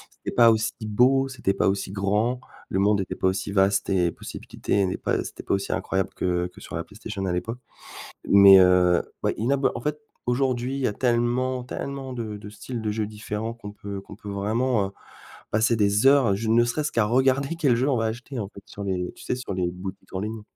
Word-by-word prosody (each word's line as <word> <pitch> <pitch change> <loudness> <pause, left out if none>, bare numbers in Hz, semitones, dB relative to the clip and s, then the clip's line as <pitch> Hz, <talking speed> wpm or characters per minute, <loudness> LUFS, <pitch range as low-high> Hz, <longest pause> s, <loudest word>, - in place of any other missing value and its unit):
c'était - - -7
pas 115 -1 +7
aussi 110 0 0
beau, 130 +5 +3
c'était 120 -7 -1
pas - - +2
aussi 95 -1 -2
grand, 105 +5 0 0.3
le 95 - -1
monde 100 +1 +3
était 95 - -3
pas - - 0
aussi 95 +1 -1
vaste 95 0 +2
et 90 -3 +2
possibilité 100 +4 -2
n'est 90 - -2
pas - - -1
c'était - - -9
pas - - -1
aussi 100 - -1
incroyable 95 -1 -1
que 90 -1 -1
que 90 - -16
sur - - -8
la - - -2
PlayStation 95 - -6
à 95 - 0
l'époque. 115 +7 -3 0.7
Mais, 100 -1 +9
heu, 90 -1 +5 0.2
ouais, - - +1
inabo 135 +5 +2
en 120 - -5
fait, 150 +3 -2 0.3
aujourd'hui, 125 0 0
il 140 - -3
y - - +2
a 105 - -1
tellement, 125 +2 0
tellement 135 +1 -5
de 110 -4 -5
de 105 0 -10
styles 115 +3 -6
de 105 - 0
jeux 105 0 -2
différents 105 +1 -5
qu'on 105 -3 -9
peut 100 -1 -7
qu'on 100 - -12
peut 105 0 -10
vraiment, 105 +2 0
heu, - - -10 0.6
passer 110 +3 +3
des 105 +2 +2
heures, 140 -1 +6
à 100 - +2
je 110 +3 -3
ne 120 +1 +5
serait-ce 150 +6 -1
qu'à 115 -3 +2
regarder 130 +6 +2
quel 145 -7 +2
jeu 125 +4 +1
on 135 - +2
va 115 - 0
acheter 120 +4 -4
en 100 -3 -4
fait 100 - -13
sur 100 - -8
les 90 -2 -2
tu - - -13
sais - - -1
sur 125 -5 -5
les 90 -2 -1
boutiques 90 +2 -9
en 95 - -2
ligne. 110 +1 -4
110 Hz, 230 wpm, -25 LUFS, 100-125 Hz, 0.7 s, Mais